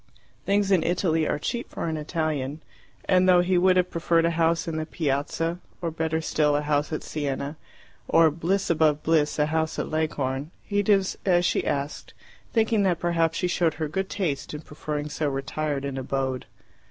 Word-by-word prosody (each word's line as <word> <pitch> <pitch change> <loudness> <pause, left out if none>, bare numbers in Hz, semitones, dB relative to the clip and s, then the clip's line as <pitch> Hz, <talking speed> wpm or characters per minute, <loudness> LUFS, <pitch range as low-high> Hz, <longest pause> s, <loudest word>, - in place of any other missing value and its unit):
Things 200 0 +2
in 185 -4 +5
Italy 165 -2 +1
are - - 0
cheap 235 - -3
for - - -4
an 160 - -1
Italian, 155 -2 -2 0.4
and, 185 0 +4
though 180 -1 +7
he 180 +1 +1
would 185 0 +4
have 180 0 +2
preferred 165 0 +2
a 170 - +2
house 165 0 +1
in 160 -1 -2
the 155 - -2
piazza, 165 +3 -1 0.2
or 170 -2 -2
better 160 0 -1
still 150 -2 +2
a 145 - 0
house 150 0 0
at 155 - -3
Siena, 145 0 -3 0.5
or, 165 -1 +5
bliss 175 +5 0
above 155 -2 +2
bliss, 155 -2 +2
a 150 - +3
house 160 +1 -1
at - - -3
Leghorn, 145 -3 -1
he 205 -1 0
did 200 -1 +3 0.2
as 175 -2 +3
she - - +1
asked, 140 +1 -3 0.4
thinking 225 -2 +2
that 185 -3 +2
perhaps 165 -2 +1
she 180 - 0
showed 170 -3 +1
her 160 -1 -2
good 190 +5 -3
taste 155 -6 -2
in 150 - -6
preferring 150 -1 -5
so 150 0 -1
retired 140 +1 -2
an 135 -1 -3
abode. 130 -1 -2
160 Hz, 190 wpm, -25 LUFS, 150-175 Hz, 0.5 s, though